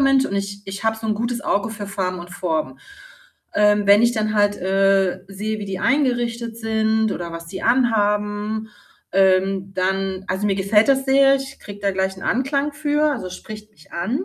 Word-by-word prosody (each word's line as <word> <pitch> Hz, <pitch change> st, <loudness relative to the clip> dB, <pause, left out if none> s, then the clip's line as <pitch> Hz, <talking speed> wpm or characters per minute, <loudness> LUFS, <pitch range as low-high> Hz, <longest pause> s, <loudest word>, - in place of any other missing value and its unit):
Mensch 275 Hz, -1 st, +4 dB
und -, -, -4 dB
ich 200 Hz, 0 st, -3 dB
ich 195 Hz, +2 st, -6 dB
habe 225 Hz, 0 st, +1 dB
so 220 Hz, 0 st, -6 dB
'n 215 Hz, -, +1 dB
gutes 235 Hz, +2 st, -2 dB
Auge 205 Hz, +2 st, 0 dB
für 205 Hz, -2 st, -6 dB
Farben 185 Hz, -2 st, -3 dB
und 175 Hz, +1 st, -10 dB
Formen. 160 Hz, -8 st, -2 dB, 0.8 s
Ähm, 210 Hz, 0 st, +3 dB
wenn 200 Hz, +2 st, +6 dB
ich 235 Hz, 0 st, +4 dB
dann 215 Hz, -1 st, -1 dB
halt, 205 Hz, -1 st, +3 dB
äh, 195 Hz, 0 st, +2 dB
sehe, 210 Hz, +2 st, -4 dB
wie 205 Hz, -, -5 dB
die 190 Hz, -1 st, -4 dB
eingerichtet 240 Hz, -4 st, 0 dB
sind 220 Hz, -1 st, +1 dB
oder 170 Hz, -1 st, -5 dB
was 165 Hz, 0 st, -7 dB
die 190 Hz, +3 st, -7 dB
an 240 Hz, +1 st, +3 dB
haben, 210 Hz, +1 st, -1 dB, 0.4 s
ähm, 190 Hz, 0 st, +2 dB
dann 190 Hz, +1 st, -1 dB
also, 200 Hz, +2 st, -1 dB
mir 200 Hz, -, +2 dB
gefällt 210 Hz, +4 st, +3 dB
das 270 Hz, -1 st, +3 dB
sehr, 275 Hz, 0 st, +5 dB
ich 270 Hz, 0 st, -7 dB
kriege 205 Hz, 0 st, -10 dB
da 200 Hz, -1 st, +1 dB
gleich 190 Hz, 0 st, -1 dB
'n 190 Hz, -, -11 dB
Anklang 275 Hz, +4 st, 0 dB
für, 300 Hz, +1 st, +1 dB
also, 235 Hz, -9 st, -4 dB
es 180 Hz, -, -8 dB
spricht 215 Hz, +1 st, -10 dB
mich 155 Hz, -, -21 dB
an. 220 Hz, -, -2 dB
210 Hz, 200 wpm, -21 LUFS, 195-235 Hz, 0.8 s, wenn